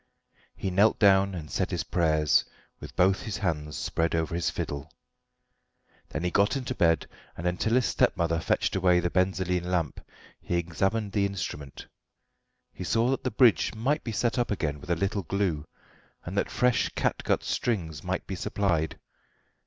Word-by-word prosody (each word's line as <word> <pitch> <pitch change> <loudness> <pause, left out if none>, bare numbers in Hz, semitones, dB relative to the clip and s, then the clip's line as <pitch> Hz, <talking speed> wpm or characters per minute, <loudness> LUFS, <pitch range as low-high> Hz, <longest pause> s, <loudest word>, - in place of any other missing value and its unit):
He 95 - -3
knelt 100 +4 +4
down 95 -2 +4
and 80 -3 -7
said - - 0
his - - -2
prayers, 80 -3 +2 0.4
with - - -10
both 95 +2 +3
his 110 - -4
hands 75 -7 -2
spread 80 0 -1
over 80 -1 -1
his 85 0 0
fiddle. 70 +2 -5 1.2
Then 75 - -4
he 90 - 0
got 100 +6 +3
into 130 - -3
bed, 85 -1 +2 0.3
and 85 - -6
until 90 +6 +1
his 125 -2 +3
stepmother 85 -1 +1
fetched - - 0
away 90 -1 +4
the 90 0 -1
benzoline 90 -1 0
lamp 85 -6 -1 0.4
he 90 - -2
examined 95 +5 0
the 100 0 +2
instrument. 75 -8 -6 0.9
He - - -7
saw 115 +7 +2
that 135 - -2
the - - 0
bridge 115 0 +3
might 135 +8 0
be 115 - -4
set 115 +4 0
up 120 - 0
again 75 -8 -2
with 95 - -12
a 85 - +3
little 100 +4 -1
glue, 90 -4 -1 0.6
and - - -5
that - - 0
fresh 125 -1 +2
catgut - - 0
strings 85 -11 -2
might - - -2
be - - -5
supplied. 85 -6 -1
90 Hz, 170 wpm, -28 LUFS, 85-100 Hz, 1.2 s, knelt